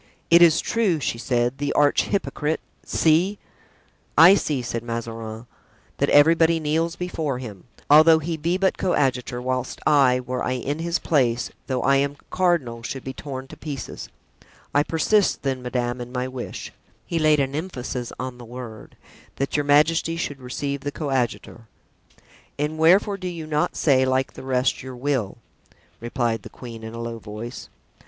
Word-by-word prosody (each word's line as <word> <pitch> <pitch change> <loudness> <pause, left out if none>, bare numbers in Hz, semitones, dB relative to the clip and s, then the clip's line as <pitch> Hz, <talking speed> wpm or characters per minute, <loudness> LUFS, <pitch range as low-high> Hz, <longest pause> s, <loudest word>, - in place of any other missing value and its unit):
"It 170 +1 +8
is 165 -2 +6
true," 210 -9 +1
she 115 -3 -2
said, 120 +1 0
"the 145 0 -1
arch 145 -1 +3
hypocrite—see!" 165 +1 0 0.8
"I 165 +5 +9
see," 150 -9 0
said 115 -1 -3
Mazarin, 115 -1 -6 0.5
"that - - +2
everybody 165 +2 +5
kneels 160 +2 0
before 160 -7 -3
him, 110 -7 -9 0.2
although 155 +2 +7
he 165 +1 -3
be 165 +4 0
but 190 0 +1
coadjutor, 130 -9 0
whilst 130 0 -3
I, 135 -4 +4
were 125 0 -4
I 125 - 0
in 140 +4 -3
his 170 +1 0
place, 125 -8 +1 0.2
though 130 -2 -1
I 140 0 +4
am 140 +1 0
cardinal, 165 -11 +1
should 130 +3 -5
be 130 - -5
torn 130 -1 -7
to - - -10
pieces. 145 -4 -7 0.6
I 145 - +4
persist, 175 +7 +1
then, 135 -2 -1
madame, 125 0 -2
in 120 0 -7
my 125 0 -2
wish" 130 -1 -7 0.3
(he 165 - -2
laid 155 -1 +4
an 135 -1 0
emphasis 135 -6 -4
on 130 -1 -5
the - - -9
word), 120 -2 -10 0.4
"that 135 - -2
your 145 -1 +1
majesty 160 +3 +3
should 145 -4 -4
receive 140 +2 -4
the 145 - -3
coadjutor." 130 -5 -3 0.9
"And 150 +2 -2
wherefore 190 +5 +4
do 185 -1 -5
you 170 -3 -5
not 150 -1 0
say, 135 -4 +3
like 130 0 0
the - - -10
rest, 130 -1 0
your 130 -1 -8
will?" 125 -6 -2 0.6
replied 120 -1 -1
the - - -10
queen, 115 -3 -10
in 110 +1 -7
a - - -6
low 115 -1 -5
voice. 110 +4 -8
135 Hz, 165 wpm, -23 LUFS, 125-160 Hz, 0.9 s, I